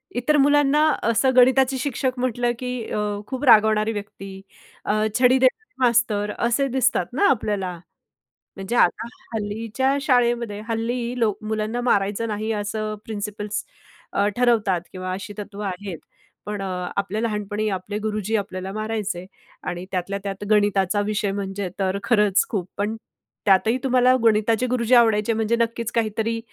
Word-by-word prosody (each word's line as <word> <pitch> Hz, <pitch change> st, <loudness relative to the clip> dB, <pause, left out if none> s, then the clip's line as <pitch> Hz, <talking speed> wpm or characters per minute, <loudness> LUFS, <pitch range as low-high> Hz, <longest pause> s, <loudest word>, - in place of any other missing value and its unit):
इतर 255 Hz, +5 st, +2 dB
मुलांना 290 Hz, 0 st, +4 dB, 0.2 s
असं 230 Hz, +4 st, +3 dB
गणिताचे 260 Hz, +1 st, +5 dB
शिक्षक 255 Hz, -1 st, -2 dB
म्हटलं 245 Hz, -1 st, 0 dB
की 250 Hz, -, -4 dB, 0.2 s
अ, -, -, -1 dB, 0.3 s
खूप 260 Hz, +1 st, -5 dB
रागवणारी 220 Hz, -2 st, +5 dB
व्यक्ती, 195 Hz, -2 st, -8 dB, 0.4 s
अ, -, -, +1 dB, 0.3 s
छडी 255 Hz, +1 st, +5 dB
देणारे 265 Hz, +13 st, +1 dB
मास्तर 225 Hz, -4 st, +2 dB
असे 240 Hz, +4 st, +1 dB
दिसतात 260 Hz, 0 st, +1 dB
ना 360 Hz, +10 st, +3 dB
आपल्याला. 205 Hz, -6 st, 0 dB, 0.8 s
म्हणजे 195 Hz, +4 st, -4 dB
आता 225 Hz, +1 st, +2 dB, 0.3 s
हल्लीच्या 225 Hz, +5 st, -1 dB
शाळेमध्ये, 240 Hz, -5 st, +1 dB
हल्ली 235 Hz, +2 st, -2 dB
लोक 215 Hz, -3 st, +1 dB
मुलांना 220 Hz, +2 st, -2 dB
मारायचं 205 Hz, -1 st, +1 dB
नाही 215 Hz, +1 st, -2 dB
असं 215 Hz, +1 st, -3 dB
प्रिन्सिपल्स 210 Hz, -1 st, -4 dB, 0.5 s
अ, 200 Hz, +1 st, +2 dB
ठरवतात 225 Hz, -7 st, +2 dB
किंवा 185 Hz, 0 st, -5 dB
अशी 200 Hz, +3 st, -6 dB
तत्व 205 Hz, -1 st, -8 dB
आहेत. 195 Hz, -3 st, -5 dB, 0.5 s
पण 210 Hz, -1 st, -4 dB
अ, 195 Hz, -, -3 dB, 0.3 s
आपल्या 200 Hz, +2 st, -1 dB
लहानपणी 210 Hz, -1 st, -2 dB
आपले 205 Hz, +3 st, -6 dB
गुरुजी 215 Hz, 0 st, -1 dB
आपल्याला 190 Hz, -2 st, -5 dB
मारायचे 215 Hz, -4 st, -3 dB, 0.4 s
आणि 175 Hz, +1 st, -4 dB
त्यातल्यात्यात 195 Hz, +2 st, -3 dB
गणिताचा 205 Hz, -2 st, +2 dB
विषय 210 Hz, -1 st, -1 dB
म्हणजे 195 Hz, -1 st, -4 dB
तर 195 Hz, 0 st, 0 dB
खरंच 210 Hz, -4 st, +3 dB
खूप. 190 Hz, -5 st, -2 dB
पण 210 Hz, +2 st, -1 dB, 0.5 s
त्यातही 205 Hz, +5 st, +4 dB
तुम्हाला 255 Hz, -1 st, +4 dB
गणिताचे 225 Hz, +2 st, +3 dB
गुरुजी 250 Hz, 0 st, +2 dB
आवडायचे 225 Hz, -2 st, +4 dB
म्हणजे 225 Hz, +1 st, +1 dB
नक्कीच 230 Hz, -1 st, -1 dB
काहीतरी 225 Hz, 0 st, 0 dB
215 Hz, 140 wpm, -23 LUFS, 205-240 Hz, 0.8 s, गणिताचे